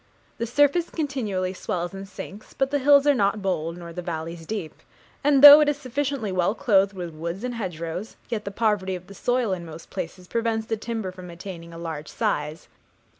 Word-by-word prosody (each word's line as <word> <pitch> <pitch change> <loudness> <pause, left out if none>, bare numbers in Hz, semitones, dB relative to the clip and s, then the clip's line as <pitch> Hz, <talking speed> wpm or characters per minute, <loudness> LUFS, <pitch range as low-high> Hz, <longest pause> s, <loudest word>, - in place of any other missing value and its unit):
The 230 - -1
surface 290 +7 +3
continually 220 - -2
swells 175 -1 -3
and 195 0 -7
sinks, 200 +2 -10
but 270 0 0
the 285 - +2
hills 280 +1 +6
are 290 - +6
not 205 -4 +1
bold, 170 -3 -1
nor 170 -1 -9
the 180 - -5
valleys 165 -1 -5
deep; 185 -7 -5 0.4
and 280 -1 +4
though 290 +1 +13
it 300 -1 +4
is 295 - 0
sufficiently 275 -4 -2
well 185 +3 +1
clothed 200 -6 +3
with 175 -3 -6
woods 170 +6 -5
and 250 0 -2
hedgerows, 180 -2 -5
yet 225 -3 -3
the 200 - -4
poverty 200 -3 0
of 180 0 -9
the 200 - -12
soil 245 -1 0
in 175 -2 -4
most 165 0 -11
places 180 +2 -6
prevents 225 0 -1
the 225 - -1
timber 220 -3 -4
from 185 -1 -10
attaining 170 -1 -9
a 165 - -9
large 160 -3 -5
size. 150 +2 -2
195 Hz, 200 wpm, -25 LUFS, 170-245 Hz, 0.4 s, though